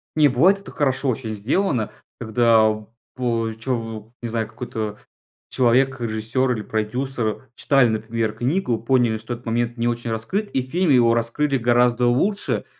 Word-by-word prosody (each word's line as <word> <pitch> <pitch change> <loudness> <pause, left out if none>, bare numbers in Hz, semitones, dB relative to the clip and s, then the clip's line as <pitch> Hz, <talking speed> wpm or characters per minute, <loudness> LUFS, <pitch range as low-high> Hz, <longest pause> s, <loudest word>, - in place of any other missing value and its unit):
Не, 155 -1 +5
бывает, 165 +10 +4
это 200 - -12
хорошо 135 -1 0
очень 115 -2 -3
сделано, 120 - 0 0.3
когда 110 -2 +3 0.3
по 115 -3 -1
чову 115 -2 -4
не 120 - -4
знаю, 110 -1 -2
какой-то 110 -2 -5 0.5
человек, 130 +1 +2
режиссер 115 +3 -1
или 110 -3 -2
продюсер 115 +3 -3
читали, 135 -4 +3
например, 110 0 -2
книгу, 120 - -1
поняли, 120 -2 +2
что 110 +3 -6
этот 120 +1 -10
момент 120 +1 -1
не 115 +1 0
очень 120 -1 -2
раскрыт, 190 - -2
и 130 - +1
в - - -17
фильме 170 -2 +3
его 120 -2 +5
раскрыли 135 +5 0
гораздо 120 0 +3
лучше, 195 +13 0
120 Hz, 155 wpm, -22 LUFS, 110-130 Hz, 0.5 s, Не